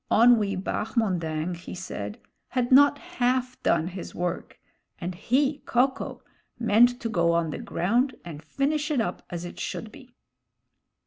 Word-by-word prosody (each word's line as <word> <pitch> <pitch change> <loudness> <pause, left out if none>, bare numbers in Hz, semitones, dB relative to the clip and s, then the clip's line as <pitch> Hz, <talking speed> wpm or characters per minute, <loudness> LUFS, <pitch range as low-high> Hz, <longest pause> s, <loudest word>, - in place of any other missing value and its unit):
Onwee 220 -3 +5
Bahmondang, 180 -5 -1
he 170 - -9
said, 105 - -6 0.3
had 250 -1 -1
not 285 +2 +7
half 255 -6 -1
done 170 +1 +2
his 185 -1 -8
work, 175 0 -3 0.4
and 180 0 -4
he, 270 - +1
Ko 250 +3 +4
ko, 265 - -8 0.3
meant 240 +2 +4
to - - -2
go 170 -6 +2
on 170 -2 +1
the - - -5
ground 235 +9 0
and 155 -3 -8
finish 290 - -1
it 295 -4 +1
up 200 -6 -2
as 175 0 -5
it 175 - -9
should 225 - -5
he. 260 -4 -15
220 Hz, 150 wpm, -26 LUFS, 175-255 Hz, 0.4 s, not